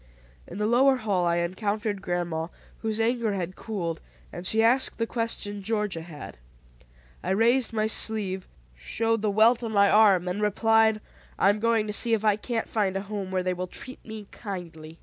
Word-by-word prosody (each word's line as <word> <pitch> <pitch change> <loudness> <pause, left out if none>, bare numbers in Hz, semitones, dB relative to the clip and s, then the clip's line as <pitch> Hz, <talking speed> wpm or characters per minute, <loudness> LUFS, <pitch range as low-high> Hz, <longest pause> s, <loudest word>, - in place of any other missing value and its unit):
In 180 - -8
the 210 - 0
lower 260 +4 +4
hall 200 -7 0
I 170 - +2
encountered 205 +4 -2
grandma, 175 -3 -2 0.3
whose 220 -1 -2
anger 230 -1 +1
had 185 -1 -4
cooled, 175 -7 -4 0.3
and 175 +1 -5
she 220 +2 +2
asked 250 +4 +2
the 230 - 0
question 225 -3 -3
Georgia 210 -4 -1
had. 155 - -10 0.8
I - - -4
raised 235 +6 +2
my 215 -1 0
sleeve, 210 -4 -1 0.3
showed 225 - -1
the 215 - +1
welt 225 +4 +4
on 225 - -3
my 200 -1 +4
arm, 200 -4 +5
and 180 +4 -2
replied, 220 +1 +3 0.4
"I 195 - +5
am 210 - -3
going 230 -1 +2
to 210 - -4
see 230 +2 +3
if 220 0 -4
I 210 -1 +4
can't 225 +2 -3
find 195 -3 0
a - - -2
home 200 -1 -5
where 185 -1 -1
they 185 0 0
will 180 +1 -4
treat 255 +8 -9
me 220 -2 -8
kindly." 165 -6 -8
210 Hz, 190 wpm, -26 LUFS, 185-225 Hz, 0.8 s, arm